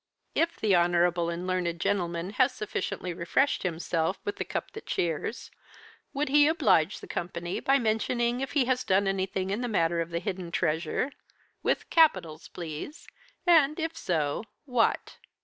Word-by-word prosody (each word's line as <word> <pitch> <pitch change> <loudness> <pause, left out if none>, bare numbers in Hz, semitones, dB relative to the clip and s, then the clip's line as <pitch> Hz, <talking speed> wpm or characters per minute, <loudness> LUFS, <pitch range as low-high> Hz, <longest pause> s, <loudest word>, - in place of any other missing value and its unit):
"If 335 +1 0
the 205 -3 +3
honourable 175 0 +2
and 170 +1 -4
learned 180 -2 -1
gentleman 175 -1 -1
has 255 +4 +2
sufficiently 185 -3 -3
refreshed 170 +11 +1
himself 165 0 -1
with 205 - -3
the - - -1
cup - - -4
that 440 - -10
cheers, 170 +7 -2 0.6
would 295 +1 -1
he 290 +1 +6
oblige 215 - +2
the - - -10
company 175 0 -4
by 275 +1 +3
mentioning 240 +1 0
if 270 - -4
he 280 -4 +3
has 255 0 +1
done 195 -2 +2
anything 190 0 -1
in 210 +4 -1
the 245 - -1
matter 170 -6 +1
of 165 - -4
the 170 - -2
Hidden 180 -1 -4
Treasure 165 - 0 0.5
with - - -1
capitals 180 - +3
please! 170 - -7 0.4
and, 315 -3 +5
if 325 0 -2
so, 155 -1 -1 0.2
what?" 250 -4 0
190 Hz, 160 wpm, -28 LUFS, 170-255 Hz, 0.6 s, he